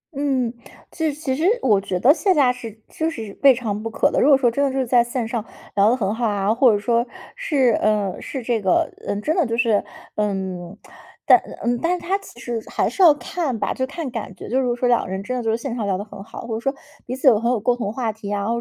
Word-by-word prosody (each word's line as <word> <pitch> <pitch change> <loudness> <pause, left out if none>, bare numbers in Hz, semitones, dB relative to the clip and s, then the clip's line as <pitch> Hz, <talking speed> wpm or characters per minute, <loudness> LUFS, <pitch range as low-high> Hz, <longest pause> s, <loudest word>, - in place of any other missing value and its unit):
嗯， 265 -4 0 0.4
其 320 -2 -1
实 285 - -11
其 265 -4 -1
实 310 - -3 0.2
我 205 -5 +4
觉 185 -2 -3
得 260 +8 +6
线 370 +2 +1
下 270 -4 +4
是 225 -3 -9
就 320 0 -2
是 220 -9 -7
未 275 - +8
尝 215 -4 -3
不 225 - -4
可 225 - +1
的。 - - +1
如 - - +4
果 275 - +7
说 245 -3 +2
真 280 +5 0
的 275 - +1
是 265 -1 0
在 240 0 +4
线 240 -1 -3
上 230 -2 -3 0.3
聊 200 +1 +5
得 250 - +2
很 200 -3 -1
好 230 +1 -1
啊， 205 +1 +1
或 250 0 +5
者 210 - +2
说， 235 +3 +1 0.3
是 290 - +2
呃， 210 -3 0
是 265 -4 -5
这 230 -2 0
个 190 -2 +2 0.2
嗯， 205 - -1
真 315 - 0
的 350 - +3
就 230 - -2
是 230 -4 +2 0.3
嗯， 190 -3 -3 0.5
但 - - +7 0.2
嗯， 240 0 0
但 360 +2 +1
它 380 +3 -1
其 315 -11 -14
实 235 -2 -4
还 - - 0
是 - - -3
要 340 -4 +9
看 295 -4 -3
吧， - - -1
就 260 0 -2
看 290 -2 -5
感 215 -5 -6
觉， - - -9
就 260 +3 +1
是 245 -2 0
说 250 - +2
两 240 - +3
个 - - -7
人 190 +1 -4
真 255 +4 -3
的 250 - -2
就 225 - 0
是 225 - +1
线 235 0 -5
上 215 -4 -2
聊 190 -2 0
得 200 - -4
很 195 -2 -10
好， - - -9
或 230 -2 -4
者 - - -3
说 270 +3 -2 0.3
彼 250 - -3
此 265 +2 -1
有 225 -5 +7
很 235 +2 0
有 245 - +1
共 240 +3 +1
同 220 -4 -3
话 230 -2 -2
题 205 -1 -8
啊， 200 0 -1
或 235 - 0
235 Hz, 295 characters per minute, -22 LUFS, 210-265 Hz, 0.5 s, 要